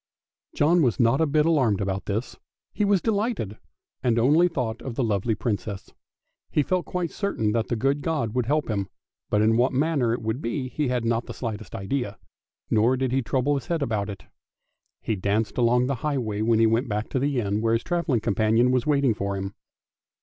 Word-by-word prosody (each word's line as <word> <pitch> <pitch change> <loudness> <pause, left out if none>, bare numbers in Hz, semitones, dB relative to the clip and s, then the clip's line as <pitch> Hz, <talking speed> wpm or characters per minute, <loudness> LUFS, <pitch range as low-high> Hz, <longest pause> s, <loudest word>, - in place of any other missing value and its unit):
John 165 +4 +4
was 120 - +1
not 120 +5 +3
a 160 - +3
bit 150 +1 +2
alarmed 130 -12 +2
about 95 -1 -2
himself; 110 +5 -3 0.3
he 210 - 0
was 200 -3 +2
delighted, 205 - -1 0.4
and 120 -2 +1
only 150 +9 +5
thought 125 -9 -3
of 125 -4 -6
the 130 - 0
lovely 110 0 0
Princess. 100 -2 -4 0.6
He 150 - +2
felt 185 +4 -1
quite 180 -3 -2
certain 155 - -1
that 115 0 0
the 120 - -1
good 135 +5 0
God 145 -9 -1
would 125 -2 0
help 150 +2 +1
him, 100 -4 -2 0.4
but 105 0 +2
in 110 +1 +3
what 125 +3 +2
manner 140 -3 +1
it 115 - -2
would 110 +5 -2
be 130 +1 -3
he 150 +2 -1
had 125 -2 -1
not 115 +1 0
the - - -7
slightest 110 -5 -5
idea, 105 +1 -3 0.5
nor 115 +4 +3
did 130 -1 -1
he 135 +1 +2
trouble 130 +4 0
his 140 -3 -3
head 165 -4 0
about 105 -5 -1
it. 95 -4 -8 0.8
He 110 - -1
danced 105 +5 -1
along 125 +1 +3
the 140 - 0
highway, 120 -9 -1
when 115 +1 +3
he 115 - +5
went 115 +3 +1
back 105 +1 -2
to 130 - -1
the 140 -1 0
inn 105 -1 -1
where 115 0 +2
his 115 - +1
travelling 170 -9 0
companion 115 +3 +2
was 125 +2 +1
waiting 140 -5 +3
for 100 -1 -3
him. 95 +1 -4
120 Hz, 210 wpm, -25 LUFS, 110-140 Hz, 0.8 s, only